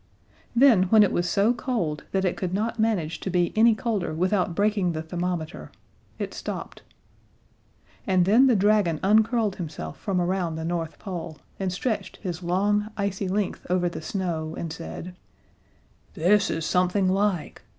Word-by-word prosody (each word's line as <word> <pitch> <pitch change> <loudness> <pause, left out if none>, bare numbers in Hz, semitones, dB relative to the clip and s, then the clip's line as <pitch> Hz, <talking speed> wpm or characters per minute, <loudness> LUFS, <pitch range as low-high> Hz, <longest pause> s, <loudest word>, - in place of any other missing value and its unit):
Then, 235 -7 +6
when 215 +3 +6
it 200 - +2
was 175 0 0
so 205 +5 +3
cold 225 - -2
that 190 0 0
it 180 - 0
could 185 -1 -3
not 220 +3 -2
manage 195 -8 0
to - - -4
be 175 -1 +1
any 225 +1 +5
colder 205 -8 -2
without 185 0 0
breaking 200 -3 +1
the 155 0 -4
thermometer, 175 0 -4 0.5
it - - -4
stopped. - - -6 1.3
And 185 -2 +3
then 230 +8 +5
the 250 - +4
dragon 200 -5 +3
uncurled 215 +1 +3
himself 150 - -6
from 190 -2 -1
around 175 -2 -1
the 160 0 -4
North 165 -1 -3
Pole, 165 -5 -6 0.2
and 190 -2 -1
stretched 220 +4 -3
his 180 -3 -5
long, 205 +4 +1
icy 200 -1 -2
length 200 +1 -2
over 180 -1 +2
the 170 - -5
snow, 160 -3 -3
and 165 -2 -4
said: 170 +2 -8 1.0
"This 200 +5 +3
is 160 -1 -2
something 180 +3 +2
like! 195 -2 0
185 Hz, 160 wpm, -25 LUFS, 170-210 Hz, 1.3 s, Then